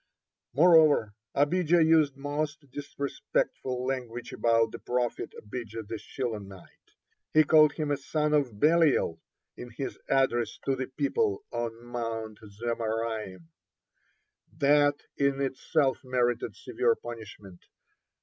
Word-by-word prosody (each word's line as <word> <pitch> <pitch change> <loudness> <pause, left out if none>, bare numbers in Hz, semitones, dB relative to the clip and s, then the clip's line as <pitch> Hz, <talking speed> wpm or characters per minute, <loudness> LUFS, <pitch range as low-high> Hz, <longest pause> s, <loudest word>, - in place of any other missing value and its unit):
Moreover, 155 -8 +5 0.2
Abijah 165 +3 +3
used 155 -4 +3
most 145 0 -4
disrespectful 140 -2 -3
language 125 -2 -4
about 115 -1 +2
the - - -8
prophet 125 -1 -2
Abijah 110 0 -7
the 110 +1 -6
Shilonite; 105 -7 -7 0.4
he 155 - +8
called 155 -1 +6
him 150 -2 -2
a 145 - +1
"son 150 +2 -1
of 130 -8 +1
Belial" 150 - +3 0.3
in 125 - -9
his 125 +4 -6
address 120 -5 +1
to 135 - +1
the 130 0 -4
people 405 - -1
on 120 0 -4
Mount 115 -3 -4
Zemaraim. 110 -4 -4 1.1
That 145 0 +3 0.2
in 140 -1 +1
itself 135 +1 0
merited 120 -2 0
severe 120 -2 0
punishment. 105 -6 -10
130 Hz, 110 wpm, -28 LUFS, 115-145 Hz, 1.1 s, he